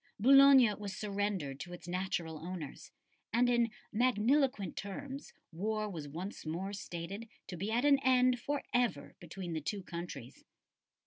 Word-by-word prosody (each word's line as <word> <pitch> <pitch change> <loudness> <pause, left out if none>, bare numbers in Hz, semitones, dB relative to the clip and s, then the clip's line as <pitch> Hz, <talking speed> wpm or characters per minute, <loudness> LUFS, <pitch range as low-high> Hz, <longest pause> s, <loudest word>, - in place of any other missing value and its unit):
Boulogne 270 -1 +8
was 200 -2 -5
surrendered 200 -9 -2
to 175 +3 -7
its 175 - -10
natural 175 -3 -2
owners, 165 -4 -7 0.4
and 245 +2 +3
in 240 -1 +3 0.2
magniloquent 245 - +2
terms 270 +8 -6 0.2
war 215 +5 -2
was 155 -5 -6
once 175 +8 -6
more 175 +6 -3
stated 195 +3 -6 0.2
to 180 - -7
be 200 +5 -3
at 240 +5 +1
an 280 -1 +6
end 255 -2 +4
for 285 +3 -2
ever 245 -13 0
between 175 0 -6
the 160 - -2
two 195 +6 -3
countries. 170 -9 -7
200 Hz, 145 wpm, -33 LUFS, 175-245 Hz, 0.4 s, Boulogne